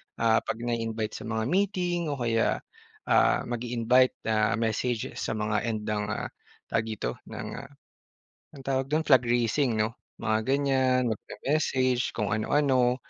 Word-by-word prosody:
Ah, 115 -1 +3
'pag - - -4
na-i-invite 115 -2 -2
sa - - -8
mga 110 0 -1
meeting 180 - 0
o 145 - -1
kaya, 115 -3 0 0.4
ah, - - +3
mag-i-invite 120 +1 +2
na 110 -1 +2
message 115 +1 -1
sa 115 - -2
mga 105 0 0
end 110 -2 -2
ng, 105 -1 -1
ah - - -3 0.4
tawag 115 0 +1
dito, 100 - -4
ng, - - -6
ah, 140 - -9 0.9
anong 135 - -11
tawag 135 0 0
do'n? 155 +2 +1
Flag 130 -5 +5
raising 120 +1 +2
'no, 110 +1 +1 0.3
mga 110 0 +2
ganyan, 130 -3 +2
mag-me-message 130 +2 0
kung 105 -3 -1
ano-ano 125 +2 +2
120 Hz, 145 wpm, -28 LUFS, 110-135 Hz, 0.9 s, Flag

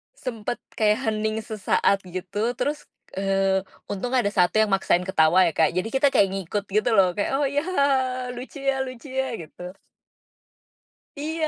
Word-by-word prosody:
Sempet 235 -2 -4 0.2
kayak 215 +2 +3
hening 215 0 0
sesaat 200 -2 +1
gitu 185 +6 -3
terus, 295 +1 -2 0.3
eee, 195 -1 +1 0.3
untung 205 +5 -3
ada 245 -6 +3
1 180 +2 +3
yang 215 - +2
maksain 190 -2 +2
ketawa 180 0 +4
ya - - 0
Kak 160 - +4
jadi 185 +5 -1
kita 270 +1 +3
kayak 200 - +5
ngikut 195 +1 -3
gitu 215 +4 +1
loh 185 -4 +4
kayak, 205 - 0
"Oh 285 - +2
ya 285 +1 0
hahaha, 260 -7 +1
lucu 260 +3 -8
ya 275 -1 +1
lucu 255 +2 -9
ya," 265 0 -1
gitu. 180 +2 -9 1.5
Iya, 315 +1 -2
215 Hz, 160 wpm, -24 LUFS, 190-260 Hz, 1.5 s, kayak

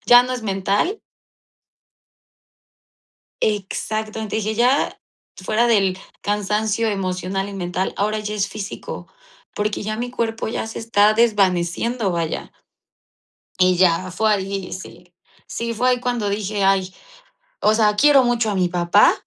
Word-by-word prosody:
ya 245 0 +8
no 255 - -4
es 245 - -6
mental". 200 - 0 2.4
Exacto, 215 +1 -2
entonces 220 0 -2
dije: 215 +1 -1
"Ya 250 +5 +2 0.4
fuera 215 +5 +1
del 195 -5 +2 0.2
cansancio 210 +2 0
emocional 195 -1 -2
y - - -8
mental, 180 0 -2
ahora 215 +2 0
ya 210 0 -4
es 200 -1 0
físico, 210 -1 -7 0.5
porque 210 0 -2
ya 215 +1 -3
mi 245 +1 -4
cuerpo 225 -2 -2
ya 220 - -3
se 225 - -6
está 215 -2 +3
desvaneciendo", 210 0 +1
vaya. 165 -2 -3 1.1
Y 185 0 +4
ya, 185 0 +2
fue 215 +4 +1
ahí, 195 -1 -3
sí, 180 -1 -10 0.3
sí, 230 0 -4
fue 250 +3 +2
ahí 250 -1 +1
cuando 245 -4 -1
dije: 200 0 -1
"Ay, 190 -1 +2 0.7
o 215 - +4
sea, 215 -2 +3
quiero 285 +1 +6
mucho 240 -2 +1
a - - -2
mi 185 -2 +1
papá, 175 0 +4
210 Hz, 140 wpm, -21 LUFS, 190-225 Hz, 2.4 s, ya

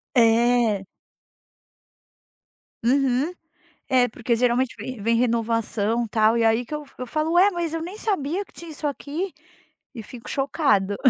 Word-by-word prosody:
É. 230 -3 +3 2.0
Uhum, 270 +5 +2 0.6
é 250 -1 +4
porque 235 0 -1
geralmente 245 +1 +1
vem 255 -4 -7
vem 230 +3 +2
renovação 230 -1 0
tal, 220 +1 +3
e 230 - +2
aí 225 +2 +3
que 300 - -5
eu 300 - -5
f 275 - -22
eu 255 - -4
falo: 310 +5 -1
“Ué, 365 +3 +6
mas 340 -3 -3
eu 330 - -2
nem 360 +5 -6
sabia 385 -3 -1
que - - -25
tinha 340 - -9
isso 305 0 -7
aqui” 295 +6 -3 0.6
e 225 - -7
fico 235 +2 -10
chocada. 270 - +1
250 Hz, 150 wpm, -24 LUFS, 230-300 Hz, 2.0 s, Ué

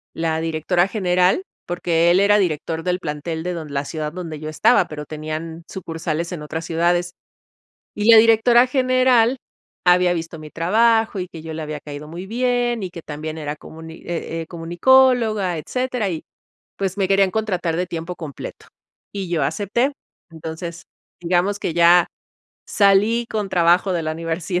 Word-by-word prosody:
la 160 -1 -1
directora 165 +3 +1
general 185 - +2 0.2
porque 170 -1 +1
él 180 - +5
era 205 +1 +4
director 165 -2 -1
del 180 +1 -1
plantel 160 0 -4
de 180 0 -2
don 160 -3 -7
la 140 0 -2
ciudad 155 0 -4
donde 165 -3 -7
yo 155 0 -6
estaba, 155 - +3
pero 150 -1 -7
tenían 155 +2 -6
sucursales 165 -2 -4
en 170 - -5
otras 160 +2 -5
ciudades 175 +1 +1 0.8
y 210 +2 +3
la 225 - +10
directora 230 +2 +5
general 255 -2 +3 0.5
había 180 0 +5
visto 165 -1 -5
mi 155 - -10
trabajo 220 +5 +2
y 180 - -4
que 165 - -10
yo 160 0 -7
le 160 - -5
había 150 0 -5
caído 145 +1 -9
muy 175 +4 -7
bien 240 0 0
y 185 - -4
que 170 - -9
también 155 +1 -6
era 150 -1 -4
comuni 160 +1 -11
eh, 165 -1 -4
eh, - - -9
comunicóloga, 215 +2 +3
etcétera. 250 +4 -2
Y, 165 -3 -5 0.5
pues 195 -1 -2
me 195 -2 +1
querían 195 0 +3
contratar 185 -6 -1
de 180 +2 -1
tiempo 170 +1 -5
completo 150 -6 -8 0.5
y 195 -3 -4
yo 165 -5 0
acepté. 205 - 0 0.4
Entonces, 165 +1 -7 0.4
digamos 180 +4 0
que 165 - -2
ya 175 +1 +6 0.6
salí 210 +4 +3
con 210 -2 -2
trabajo 175 +2 +3
de 170 -2 -1
la 155 - -1
universidad. 165 +2 -3
175 Hz, 165 wpm, -21 LUFS, 160-200 Hz, 0.8 s, la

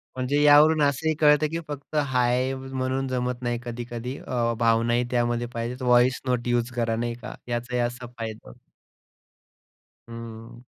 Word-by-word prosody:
म्हणजे 130 +3 0
यावरून 150 +1 +6
असंही 145 +3 +2
कळतं, 150 0 +4
की 165 - -2
फक्त 145 +1 -8
हाय 130 -2 +1
म्हणून 130 0 -3
जमत 125 -1 -2
नाही 120 -1 -1
कधी-कधी 120 +1 -5
अ, 120 -2 0
भावनाही 115 +1 +2
त्यामध्ये 120 -1 0
पाहिजेत. 120 +2 -4
व्हॉईस 125 +1 +3
नोट 125 -2 -1
युज 120 0 0
करा 115 -2 0
नाही 120 +1 -2
का - - -7
याचा 120 +1 -1
असा 120 +1 -5
फायदा 110 - -6
होतो. - - -15 1.5
हं. 115 0 -9
125 Hz, 145 wpm, -25 LUFS, 120-130 Hz, 1.5 s, यावरून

